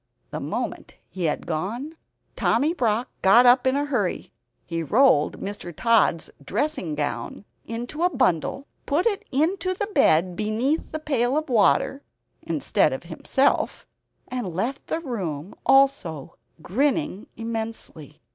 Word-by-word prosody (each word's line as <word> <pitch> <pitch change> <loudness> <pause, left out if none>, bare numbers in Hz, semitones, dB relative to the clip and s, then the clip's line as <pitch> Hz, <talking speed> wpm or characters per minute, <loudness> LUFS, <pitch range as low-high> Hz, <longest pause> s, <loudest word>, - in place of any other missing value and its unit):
The - - -4
moment - - -4 0.2
he 185 -2 -3
had 150 - -1
gone, 225 - -4 0.4
Tommy 285 +8 +2
Brock 235 -5 0
got 230 +6 +6
up 250 +1 +6
in 260 - +3
a 285 +1 0
hurry; 240 -10 -2 0.3
he 165 -1 -3
rolled 205 - +3
Mr. 195 -3 -5
Tod's 220 -2 +2
dressing 205 - -1
gown 150 +6 -4 0.2
into 240 +7 -5
a 355 - +4
bundle, 255 - 0 0.2
put 300 +5 +1
it 430 -2 +1
into 345 +6 +1
the 410 - -1
bed 175 - +3
beneath 225 - -1
the - - -2
pail 275 -4 0
of 310 -2 -2
water 215 - +3 0.4
instead - - +1
of - - -5
himself, - - 0 0.4
and 240 -9 -4
left 245 +9 -3
the 325 - -2
room 185 - -4
also 270 - +2 0.3
grinning 275 - 0
immensely. 225 -10 -6
235 Hz, 135 wpm, -24 LUFS, 185-285 Hz, 0.4 s, got